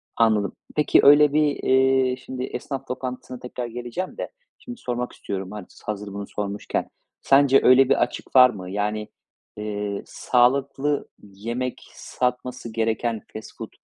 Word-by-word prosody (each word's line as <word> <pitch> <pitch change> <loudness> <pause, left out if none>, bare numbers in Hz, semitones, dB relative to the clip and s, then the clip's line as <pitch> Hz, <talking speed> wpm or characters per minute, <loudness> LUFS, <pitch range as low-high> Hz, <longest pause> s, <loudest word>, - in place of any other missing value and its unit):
Anladım. 110 -3 +2 0.2
Peki, 150 - +4
öyle 145 +1 +7
bir, 155 - +4 0.2
eee, 130 -1 +3
şimdi 130 0 -6
esnaf 135 0 -5
lokantasına 125 -1 -6
tekrar 125 0 -5
geleceğim 120 +10 -5
de - - -4 0.3
şimdi 245 -1 -9
sormak 125 0 -3
istiyorum, 95 -1 -5 0.4
hazır 105 -1 -5
bunu 100 0 -6
sormuşken. 100 0 -3 0.3
Sence 135 0 +5
öyle 130 +1 +6
bir - - +3
açık - - -6
var 125 -1 +9
mı? 95 -5 -7
Yani, 105 +1 -2 0.5
eee, 105 -1 -4
sağlıklı 135 +3 +1 0.2
yemek 115 +6 -5
satması 125 -1 -3
gereken 115 0 -1
fast 110 - -9
food, - - -7
125 Hz, 135 wpm, -24 LUFS, 105-130 Hz, 0.5 s, var